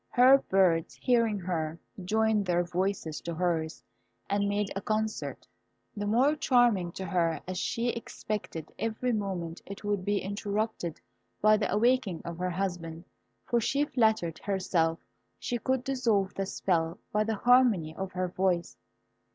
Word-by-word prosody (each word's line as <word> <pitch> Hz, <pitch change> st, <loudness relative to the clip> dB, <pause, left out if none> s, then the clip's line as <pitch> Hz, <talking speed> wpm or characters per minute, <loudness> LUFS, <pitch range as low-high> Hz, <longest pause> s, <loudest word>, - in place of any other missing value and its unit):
Her 260 Hz, +2 st, +7 dB
birds 180 Hz, -7 st, +2 dB
hearing 230 Hz, -4 st, +2 dB
her, 165 Hz, -3 st, -2 dB, 0.3 s
joined 215 Hz, +1 st, +1 dB
their 175 Hz, 0 st, +2 dB
voices 175 Hz, -2 st, -2 dB
to 170 Hz, -, -5 dB
hers, 160 Hz, -2 st, -1 dB, 0.4 s
and 200 Hz, 0 st, +1 dB
made 205 Hz, 0 st, -1 dB
a 195 Hz, -, -2 dB
concert, 215 Hz, +1 st, -2 dB, 0.5 s
the 205 Hz, -1 st, -3 dB
more 255 Hz, +8 st, +3 dB
charming 240 Hz, -, +3 dB
to 190 Hz, -, -5 dB
her 170 Hz, -2 st, +1 dB
as 185 Hz, -1 st, -3 dB
she 235 Hz, +4 st, -1 dB
expected 210 Hz, -8 st, -5 dB
every 225 Hz, +2 st, -1 dB
moment 185 Hz, -5 st, -3 dB
it 200 Hz, +1 st, -9 dB
would 205 Hz, -2 st, -1 dB
be 205 Hz, +1 st, +1 dB
interrupted 200 Hz, -3 st, -3 dB, 0.4 s
by 215 Hz, +1 st, +6 dB
the 210 Hz, -, -1 dB
awakening 230 Hz, -4 st, +2 dB
of 170 Hz, 0 st, -6 dB
her 180 Hz, 0 st, 0 dB
husband, 175 Hz, -3 st, -4 dB, 0.4 s
for 240 Hz, -1 st, +1 dB
she 280 Hz, +6 st, +1 dB
flattered 220 Hz, -, +1 dB
herself 180 Hz, -4 st, 0 dB, 0.4 s
she 240 Hz, -, -3 dB
could 260 Hz, 0 st, 0 dB
dissolve 230 Hz, -8 st, +1 dB
the 195 Hz, -1 st, -3 dB
spell 170 Hz, -3 st, 0 dB
by 210 Hz, 0 st, +2 dB
the 220 Hz, 0 st, -1 dB
harmony 225 Hz, -9 st, +4 dB
of 190 Hz, +1 st, -4 dB
her 185 Hz, 0 st, -1 dB
voice. 180 Hz, -1 st, 0 dB
200 Hz, 150 wpm, -29 LUFS, 175-220 Hz, 0.5 s, Her